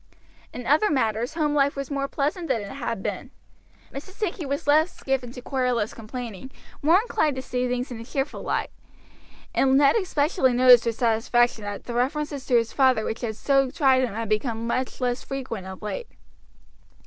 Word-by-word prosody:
In 245 - -7
other 305 - +3
matters 235 -2 0
home 300 -3 +1
life 285 -1 +2
was 275 0 -5
more 275 -1 -1
pleasant 305 +5 -2
than 225 -8 0
it 200 - -8
had 235 -6 -4
been. - - -4 0.6
Mrs. 300 +8 -8
Sankey 375 -7 -3
was 280 +1 -3
less 310 +4 +2
given 265 -3 -1
to 250 - -9
querulous 250 -5 -1
complaining, 230 0 -7 0.3
more 330 +6 +5
inclined 315 - 0
to 260 - -4
see 250 -1 -2
things 250 +1 -2
in 235 - -6
a - - -7
cheerful 270 +4 -3
light, - - -2 0.8
and 270 0 +3
Ned 280 -1 +5
especially 300 - +1
noticed 245 -1 +7
with 230 - 0
satisfaction 235 -1 +1
that 205 -1 -5
the 240 - -6
references 280 +3 -2
to 250 - +2
his 230 -1 +2
father 260 -5 +3
which 220 - -4
had 225 -3 -3
so 275 +2 +2
tried 265 -1 +3
him 230 -5 -2
had 225 0 -3
become 225 +2 -1
much 255 +2 -2
less 245 0 -1
frequent 250 -8 -5
of 190 +2 -9
late. 460 - -4
255 Hz, 185 wpm, -25 LUFS, 230-285 Hz, 0.8 s, noticed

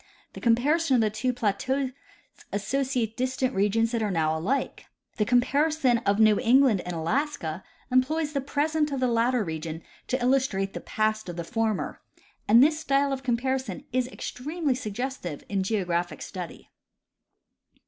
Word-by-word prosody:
The - - -9
comparison 270 +6 +3
of 240 - +4
the 215 -1 +1
two 240 +4 0
plateaus 255 +4 -1 0.6
associates 245 +2 -1
distant 260 0 -1
regions 210 +4 +2
that 235 -2 -1
are 215 - 0
now 160 -4 +1
alike. 200 +13 -2 0.3
The 210 - +2
comparison 260 +1 +2
of 200 +1 +3
New 215 -1 +5
England 245 -4 +4
and 180 - -3
Alaska 170 - -2 0.3
employs 295 +4 +1
the 280 - 0
present 300 +2 0
of 275 - -2
the 255 - +2
latter 235 0 +2
region 160 -1 -5 0.2
to 255 - 0
illustrate 245 -7 +1
the - - -5
past 215 -2 -1
of 175 - -5
the 170 - -4
former; 220 +2 -2 0.5
and 230 +4 +7
this 305 +1 +3
style 280 -2 +1
of 265 - -4
comparison 255 -4 -2
is 255 -1 +1
extremely 290 +4 -3
suggestive 235 - -4
in 200 -1 -1
geographic 180 -4 -1
study. 180 -3 -8
245 Hz, 150 wpm, -26 LUFS, 200-270 Hz, 0.6 s, and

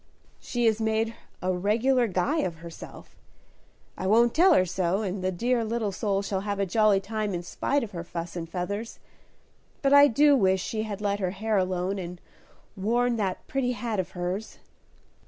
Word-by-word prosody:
"She 240 -1 -2
has 225 0 +2
made 220 +1 0 0.3
a 185 0 +1
regular 230 +7 +2
guy 215 - 0
of 180 - -1
herself; 165 0 -11 0.8
I 190 - -3
won't 230 +3 +4
tell 365 +4 +5
her 185 - +4
so, 185 +3 -1
and 190 -1 -3
the 185 - +1
dear 235 +6 0
little 220 -2 -1
soul 200 0 -1
shall 195 -1 -2
have 200 0 -3
a 200 - +1
jolly 210 +1 +3
time 210 0 -3
in 175 - -4
spite 280 +10 -1
of 215 - -6
her 170 -3 -5
fuss 170 0 -6
and 165 -2 -5
feathers. 200 +6 -4 0.9
But 275 0 +3
I 285 0 +9
do 290 +3 +5
wish 190 -6 +3
she 215 +4 -3
had 210 -2 -5
let 205 -1 0
her 185 -2 0
hair 215 +4 -2
alone 185 +1 -1
and 175 -1 -7 0.6
worn 235 +4 +1
that 195 -4 -2
pretty 255 -2 0
hat 230 -4 -3
of 185 0 -3
hers." 180 +5 -4
205 Hz, 185 wpm, -27 LUFS, 185-230 Hz, 0.9 s, I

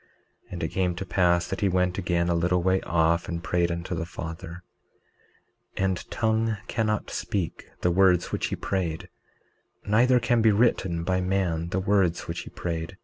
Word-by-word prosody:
19:31 - - -13
And - - -4
it - - +1
came 90 -2 0
to 95 +3 -5
pass 85 -2 +2
that 95 - -4
he 100 - +3
went 90 0 +1
again 85 -2 0
a 85 - +2
little 90 +1 +1
way 95 +1 +2
off 85 0 +1
and 85 -1 -4
prayed 85 +1 +1
unto 85 +2 -4
the 85 -1 -3
Father; 85 +1 -7 1.1
19:32 - - 0
And 95 -2 -2
tongue 110 -1 0
cannot 110 -2 -1
speak 95 -5 -3
the 90 - +2
words 90 -1 +3
which - - -1
he - - -3
prayed, 85 -4 -3 0.8
neither 125 +5 +4
can 120 -1 +2
be 110 -1 +5
written 95 -6 +1
by 95 +1 0
man 90 -3 0
the 95 - -1
words 95 -3 +2
which - - -4
he - - -8
prayed. 85 +2 -5
90 Hz, 185 wpm, -26 LUFS, 85-95 Hz, 1.1 s, be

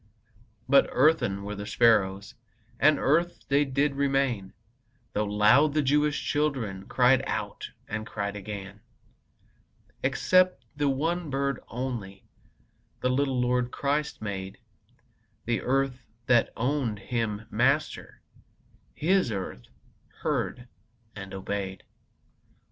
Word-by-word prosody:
But 140 +1 +5
earthen 130 -9 +2
were 105 +1 -5
the 100 0 -6
sparrows, 100 -5 +2 0.5
And 155 -1 +5
earth 170 +5 +1
they 140 +1 +3
did 140 +1 +1
remain, 135 -7 0 0.6
Though 105 - 0
loud 110 +9 +4
the 150 - +3
Jewish 150 +2 +2
children 125 -11 -1
Cried 125 0 +4
out, - - -4 0.2
and 110 0 -3
cried 100 -1 -4
again. 100 0 -7 1.2
Except 185 0 +2
the 145 -1 +1
one 160 +5 -1
bird 140 -1 -1
only 115 -6 -5 0.8
The 125 - +1
little 135 -1 +1
Lord 125 0 +1
Christ 145 0 -2
made; 95 -2 -5 0.9
The 120 0 0
earth 130 -1 -1 0.2
that 120 -2 +3
owned 125 -3 0
Him 110 0 -3
Master, 135 +7 0 0.7
His 180 -5 +2
earth 95 - -5 0.6
heard 125 0 -2 0.5
and 100 -2 -8
obeyed. 95 0 -4
125 Hz, 110 wpm, -27 LUFS, 105-140 Hz, 1.2 s, But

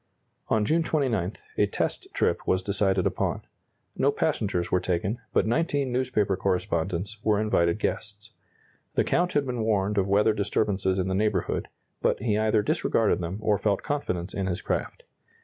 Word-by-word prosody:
On 110 -1 +2
June 165 +8 +2
29, 120 - 0 0.3
a - - +4
test - - -2
trip - - 0
was 95 0 +2
decided 95 -2 +1
upon. - - -1 0.5
No - - +3
passengers 90 -4 -1
were 90 - +3
taken, 95 +6 -1
but - - +2
19 140 +2 0
newspaper 125 -6 +1
correspondents 95 +1 -1
were 105 -2 +3
invited 85 -5 +2
guests. 105 -1 -4 0.6
The - - +3
Count 180 +1 +1
had 145 -1 +2
been 125 -3 -2
warned 105 -2 +1
of 95 - +1
weather 105 +2 +4
disturbances 100 -2 0
in 95 0 0
the 95 - -1
neighborhood, 105 +2 0 0.3
but - - +1
he 110 -4 0
either 110 0 +2
disregarded 110 0 +1
them 90 +2 -3
or 105 -2 +2
felt 100 -2 0
confidence 95 -11 -2
in 95 -1 -2
his 90 -2 -1
craft. - - -3
105 Hz, 165 wpm, -26 LUFS, 95-110 Hz, 0.6 s, a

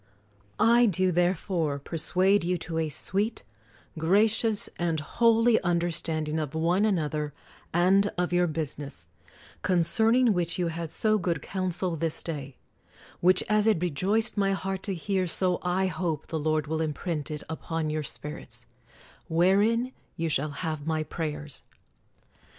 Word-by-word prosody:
I 235 +2 +5
do 185 -2 +1
therefore 175 -3 0
persuade 185 +6 +1
you 180 +1 0
to 165 0 -4
a 160 -1 -1
sweet, 200 +9 0 0.6
gra 195 +7 +4
cious, 220 -1 +2
and 165 -2 0
holy 230 +7 +3
understanding 165 -3 -1
of 150 -1 -4
one 175 +6 +2
another 155 -7 -1 0.4
and 190 +4 +4
of 180 0 -1
your 175 0 +3
business, 145 - -5 0.5
concerning 220 +7 +4
which 175 -2 -1
you 175 -2 0
had 165 0 -5
so 215 -1 +2
good 170 -5 -2
counsel 185 -2 -2
this 165 0 0
day; 140 -5 -6 0.6
which 185 +1 +4
as 215 0 +2
it 215 -4 +4
re 175 0 -1
joiced 210 +10 +1
my 195 -1 +2
heart 195 0 -3
to 195 - -1
hear, 185 +2 -1
so 180 +1 +1
I 180 +2 0
hope 175 -5 -2
the 160 - -3
Lord 155 0 0
will 160 +1 -2
imprint 155 0 -3
it 150 -1 -5
upon 160 0 -3
your 155 0 -1
spirits, 150 0 -5 0.3
— - - -25 0.3
wherein 205 +9 +2 0.3
you 165 0 -1
shal 150 0 +1
1 145 - -10
have 155 -3 -3
my 160 -1 0
prayers. 150 -2 -5
175 Hz, 150 wpm, -27 LUFS, 155-195 Hz, 0.6 s, I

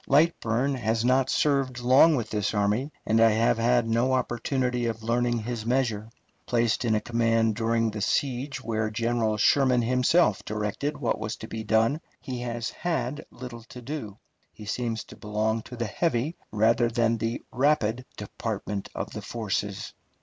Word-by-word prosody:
Lightburne 140 -4 +2
has 115 -1 0
not 130 +1 +3
served 135 -4 +1
long 130 +6 +6
with 115 -5 -3
this 105 0 -1
army, 105 +8 +1
and 110 +1 +3
I 115 - +7
have 115 +1 +2
had 120 0 +3
no 120 +3 +2
opportunity 125 0 0
of 110 -1 -4
learning 120 +1 +1
his 120 -1 -4
measure. 115 -3 0 0.4
Placed 120 -1 +1
in 115 -2 +2
a - - +2
command 115 -1 +1
during 115 0 +1
the 105 0 -5
siege 135 +5 -1
where 110 -1 -1
General 115 -1 0
Sherman 125 +2 +4
himself 125 - +3
directed 110 +8 -3
what 125 -6 -1
was 105 0 -3
to 110 - -9
be 110 0 -5
done, 115 +8 +2 0.2
he 130 -3 -5
has 120 -1 -3
had 150 -6 -2
little 120 -2 -9
to 125 - -11
do. 115 -7 -6 0.3
He 105 - -12
seems 115 0 -2
to - - -13
belong 110 +2 -1
to 125 - -10
the 120 0 -2
heavy 140 - -1 0.2
rather 115 +2 +3
than 115 0 +1
the 115 +2 -2
rapid 125 -3 +1
department 105 -1 -4
of - - -4
the - - -6
forces. 105 -3 -3
115 Hz, 165 wpm, -27 LUFS, 110-125 Hz, 0.4 s, I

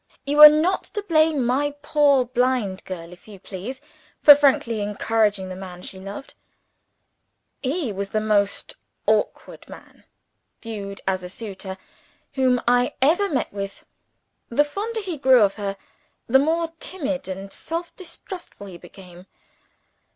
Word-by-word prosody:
You 290 +2 +3
are 300 - +14
not 320 +5 +1
to 415 - -2
blame 315 -7 +2
my 285 +4 0
poor 285 -4 +3
blind 245 -6 0
girl, 170 -2 -7
if 180 - -18
you 205 -3 -12
please, 210 +9 -8 0.4
for 290 - +10
frankly 265 -6 +2
encouraging 210 -1 0
the 185 - -6
man 180 -1 -9
she 190 - -8
loved. 200 +8 -9 1.3
He 275 - -2
was 195 0 -4
the 215 - 0
most 210 -2 -1 0.3
backward - - -1
man - - -14 0.5
viewed 200 -3 -7
as 190 -1 0
a 180 - -8
suitor 190 -2 -7 0.6
whom 255 -2 +2
I 245 +1 +2
ever 340 +9 +3
met 265 -8 -2
with. 200 -1 -6 0.6
The 265 +5 +3
fonder 430 +9 -4
he 365 -5 -5
grew 260 -4 +6
of 200 -1 +2
her, 200 -2 -4 0.5
the 265 +3 +4
more 325 +3 0
timid 290 - -4
and 195 +1 -7
self 335 +1 -5
distrustful 360 - -9
he 180 -3 -10
became. 180 0 -14
240 Hz, 145 wpm, -23 LUFS, 195-295 Hz, 1.3 s, are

